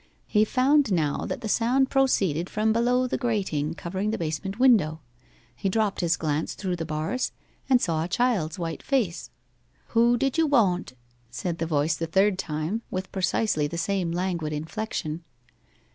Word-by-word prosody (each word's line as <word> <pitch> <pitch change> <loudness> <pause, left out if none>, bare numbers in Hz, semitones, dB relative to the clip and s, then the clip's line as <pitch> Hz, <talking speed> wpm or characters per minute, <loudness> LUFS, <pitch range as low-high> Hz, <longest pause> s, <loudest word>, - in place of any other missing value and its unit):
He 215 0 +3
found 270 +2 +3
now 155 -5 0
that - - -4
the 225 - -4
sound 250 +5 +2
proceeded 190 - +2
from 215 +1 +1
below 245 +2 +2
the 255 - -2
grating 190 - -1
covering 190 +6 -3
the 220 - -1
basement 170 +5 -3
window. 215 -12 +4 0.6
He 195 - -1
dropped 210 -1 0
his 170 -2 +2
glance 155 0 -2
through 185 -3 -3
the 165 -2 -4
bars, 155 +11 -2 0.4
and 255 -2 +6
saw 160 -7 0
a - - -3
child's 195 -7 0
white 165 -2 -4
face. 230 -11 -1 0.6
'Who 235 +1 +4
did 270 +5 0
you 325 - +4
woant?' 195 - +2 0.4
said 165 +8 -4
the 165 - -1
voice 155 0 +1
the 165 - -3
third 190 +3 +2
time, 160 +5 -2
with 185 0 -4
precisely 190 -4 +1
the 170 +3 -6
same 180 0 -1
languid 170 -3 -2
inflection. 160 0 -4
190 Hz, 165 wpm, -26 LUFS, 160-230 Hz, 0.6 s, and